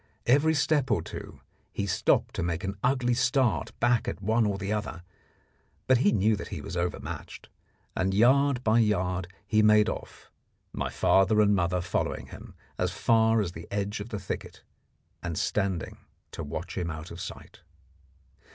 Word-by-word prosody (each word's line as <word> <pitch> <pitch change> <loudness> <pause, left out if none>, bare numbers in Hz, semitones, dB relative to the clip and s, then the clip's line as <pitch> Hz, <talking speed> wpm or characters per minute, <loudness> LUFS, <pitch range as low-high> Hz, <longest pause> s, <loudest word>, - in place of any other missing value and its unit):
Every 145 +6 +4
step 145 -2 +2
or 100 -8 +1
two - - -9 0.3
he 100 - -2
stopped 100 - +1
to - - -3
make 85 -1 -2
an 100 +1 -3
ugly 125 -1 +2
start 125 - +1
back 120 -1 +2
at - - -3
one 110 +3 +2
or 100 -1 -1
the 100 +1 -2
other, 105 -5 -4 0.8
but 130 -2 +4
he 105 - +4
knew 110 +1 +3
that - - -6
he - - -6
was 90 - -7
overmatched, 90 0 -4 0.5
and 95 +1 +1
yard 130 +5 +4
by 110 0 +4
yard 90 -4 +1 0.2
he 110 +2 +3
made 105 0 +5
off, - - -8 0.4
my - - -2
father 95 +3 +3
and 105 -1 +5
mother 90 -1 +1
following 90 - -2
him - - -11 0.2
as - - +1
far 115 -1 +3
as 90 -4 -2
the 85 0 -10
edge 100 +1 -2
of 105 +3 -7
the 110 - -4
thicket, 95 -1 -6 0.6
and 85 -3 -4
standing 95 -5 -1 0.3
to 85 - -6
watch 80 +5 -6
him 85 -2 -2
out 80 +1 -7
of 85 +1 -7
sight. - - -9
105 Hz, 170 wpm, -28 LUFS, 90-115 Hz, 0.8 s, made